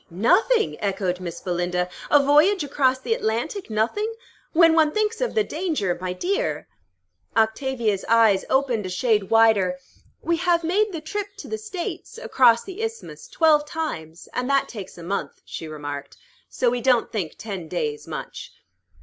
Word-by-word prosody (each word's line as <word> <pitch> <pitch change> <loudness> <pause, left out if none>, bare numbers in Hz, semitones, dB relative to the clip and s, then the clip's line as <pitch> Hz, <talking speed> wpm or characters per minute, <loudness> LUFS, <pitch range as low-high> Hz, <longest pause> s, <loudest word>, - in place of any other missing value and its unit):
"Nothing!" 370 - +2
echoed 190 -3 -1
Miss 175 -2 -6
Belinda. 180 0 -1 0.2
"A 290 -1 +5
voyage 300 +6 +4
across 265 -2 +2
the 355 - -1
Atlantic 240 - -2
nothing? 235 - 0 0.4
When 330 -1 +6
one 315 -2 +4
thinks 430 +4 -1
of - - -1
the 435 - +3
danger, 305 - -1
my 185 -1 -2
dear" 395 - -2 0.7
Octavia's 225 -2 +1
eyes 225 -4 +5
opened 255 -7 +1
a - - -5
shade 210 +1 +1
wider. 220 -5 +4 0.5
"We 340 0 +1
have 345 -1 +2
made 405 +6 +1
the 330 -4 -5
trip 410 +6 -4
to 410 - -9
the 435 - -4
States, 435 +2 -6
across 250 - +4
the 390 +2 -8
Isthmus, 455 +1 -6
twelve 315 -8 +3
times, 170 - -5
and 250 +1 -2
that 275 -1 +2
takes 205 -6 -9
a 170 - -9
month," 195 +4 -4
she 160 - -7
remarked. 145 -2 -7 0.3
"So 245 -2 +1
we 245 0 -2
don't 245 -2 +2
think 185 -8 -3
ten 195 -6 -6
days 150 -3 -3
much." - - -7
250 Hz, 160 wpm, -23 LUFS, -, 0.7 s, When